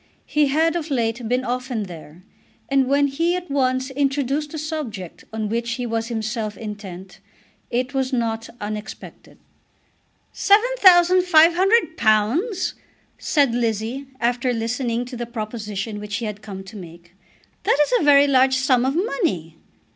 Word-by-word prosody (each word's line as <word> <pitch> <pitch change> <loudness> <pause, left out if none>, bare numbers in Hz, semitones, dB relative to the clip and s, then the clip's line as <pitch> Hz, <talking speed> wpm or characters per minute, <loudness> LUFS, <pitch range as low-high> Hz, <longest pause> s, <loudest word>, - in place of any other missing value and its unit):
He 300 -1 +2
had 320 +4 +2
of 330 -2 -3
late 235 -3 -1
been 250 +1 +1
often 250 -2 -2
there, 170 -2 -11 0.5
and 270 -1 +2
when 280 +1 +3
he 330 +6 0
at 360 -4 -6
once 260 -1 0
introduced 280 +1 -1
the 315 - -6
subject 290 - -6
on 220 -1 -3
which 230 +2 -2
he 250 0 -4
was 225 -1 -2
himself 220 -2 -3
intent 195 -4 -8 0.5
it 250 +3 -2
was 265 -1 -1
not 230 -2 -2
unexpected. 210 +1 -8 1.0
"Seven 430 +5 +3
thousand 365 -1 +6
five 335 -2 +5
hundred 375 -2 +2
pounds!" 280 - +1 0.5
said 280 -6 +2
Lizzie, 235 +3 -2
after 245 +1 0
listening 235 +1 -2
to 250 +1 -8
the 240 0 -5
proposition 215 -2 -5
which 210 0 -5
he 235 - -3
had 210 -1 -5
come 195 -2 -8
to 195 +3 -12
make. 175 -2 -12 0.5
"That - - +2
is - - -5
a - - -1
very 285 -1 +6
large 265 -1 +4
sum 260 -1 +2
of 270 - -1
money!" 315 - -1
245 Hz, 155 wpm, -22 LUFS, 215-285 Hz, 1.0 s, thousand